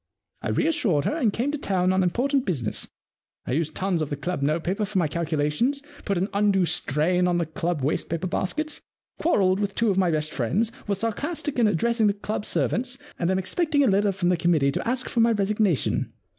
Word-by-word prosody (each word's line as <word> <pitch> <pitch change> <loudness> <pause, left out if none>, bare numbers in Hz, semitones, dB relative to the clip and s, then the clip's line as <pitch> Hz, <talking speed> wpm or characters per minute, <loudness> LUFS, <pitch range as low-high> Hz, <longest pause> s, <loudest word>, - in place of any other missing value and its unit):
I - - -3
reassured 230 - +1
her - - 0
and 250 -10 +2
came 250 +7 -1
to 300 - -3
town 185 -5 +1
on 190 - +2
important 255 +10 +1
business. 135 - -1 0.6
I - - -4
used 155 +3 -1
tons 185 -3 0
of 155 - -2
the 145 - -2
club 170 +2 -3
notepaper 165 +8 0
for 205 -1 -2
my 170 -4 +3
calculations, 165 - 0 0.2
put 200 - 0
an 185 +3 0
undue 200 -2 +3
strain 175 +4 +1
on 175 -1 +2
the 170 - 0
club 160 -1 -2
wastepaper 165 +4 -1
baskets, 300 - -2 0.4
quarrelled 195 - +2
with 200 -1 -2
two 230 -3 +2
of 190 - +1
my 185 -2 +3
best 155 -1 -1
friends, 185 - 0 0.2
was 200 -1 0
sarcastic 275 - -2
in 230 - +5
addressing 220 +3 +2
club 210 +1 -4
servants, 250 +1 0 0.2
and 170 - +1
am 190 - +2
expecting 285 - +1
a - - +3
letter 200 0 +3
from 185 -2 0
the 180 - +2
committee 160 -5 +2
to - - -3
ask 250 +1 -1
for 240 - -1
my 230 0 +5
resignation. 205 - +1
190 Hz, 200 wpm, -25 LUFS, 170-230 Hz, 0.6 s, in